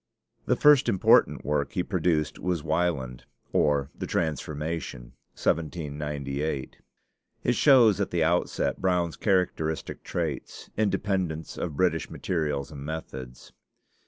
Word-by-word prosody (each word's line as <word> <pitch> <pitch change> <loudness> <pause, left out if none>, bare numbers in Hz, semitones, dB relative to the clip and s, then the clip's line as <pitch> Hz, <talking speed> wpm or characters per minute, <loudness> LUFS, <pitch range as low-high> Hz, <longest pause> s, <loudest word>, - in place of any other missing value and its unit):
The - - +3
first 150 -3 +5
important 95 - +4
work 75 -1 0
he 90 - 0
produced 85 -5 0
was 90 -4 -1
'Wieland: 80 -7 -1 0.3
or 70 -2 +2
the - - -6
Transformation' 75 -5 -3 0.2
(1798). 75 -3 -2 0.7
It 125 - +2
shows 120 -7 +5
at 100 - 0
the 85 -2 +1
outset 85 +2 0
Brown's 90 -3 +1
characteristic 90 -6 0
traits 80 -6 -4
independence 95 -6 -1
of 75 -5 -4
British 85 -2 +1
materials 75 -5 -2
and 70 -2 -8
methods. 65 -5 -7
80 Hz, 110 wpm, -27 LUFS, 75-90 Hz, 0.7 s, first